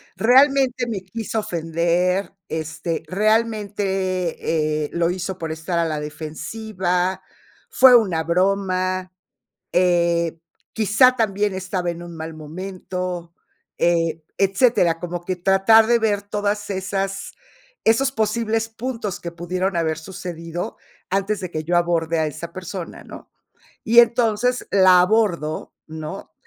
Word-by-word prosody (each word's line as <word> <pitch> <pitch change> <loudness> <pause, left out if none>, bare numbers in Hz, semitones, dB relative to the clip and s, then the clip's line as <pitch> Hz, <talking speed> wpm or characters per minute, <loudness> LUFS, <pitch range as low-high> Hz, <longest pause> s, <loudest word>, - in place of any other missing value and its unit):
realmente 260 0 +4
me 210 -5 -3
quiso 225 +3 -4
ofender, 175 +2 0
este, 160 +1 -4
realmente, 190 -6 0
eh, - - -7
lo 170 0 +1
hizo 185 +1 -3
por 165 -2 -4
estar 160 +2 -2
a 170 - +2
la 155 -2 -2
defensiva, 180 +4 -3 0.5
fue 255 -1 +7
una 185 -9 +3
broma, 185 +1 0 0.6
eh, 170 -2 +2 0.3
quizá 225 +4 +4
también 205 -3 0
estaba 185 -1 -2
en 170 0 -7
un 170 -1 -9
mal 160 0 -6
momento 180 +1 -6 0.4
eh, 165 -2 +1 0.2
etcétera, 195 -4 +3
como 175 0 -5
que 185 - -1
tratar 195 +5 +5
de 240 0 +4
ver 210 -3 0
todas 205 0 -2
esas 195 0 -3 0.5
esos 265 +4 +3
posibles 225 0 0
puntos 225 -4 -5
que 170 - -6
pudieron 180 +2 -2
haber 160 -2 0
sucedido 170 -1 -6 0.3
antes 200 +2 0
de 185 - -5
que 155 -2 -4
yo 175 +2 +1
aborde 170 -1 +1
a 155 - +1
esa 170 +3 -7
persona, 185 -1 -7
¿no? - - -12 0.6
Y 235 +2 +7
entonces, 235 +1 +2
la 185 -2 +6
abordo, 180 -6 0
¿no? 160 +4 -8
185 Hz, 125 wpm, -22 LUFS, 170-210 Hz, 0.6 s, fue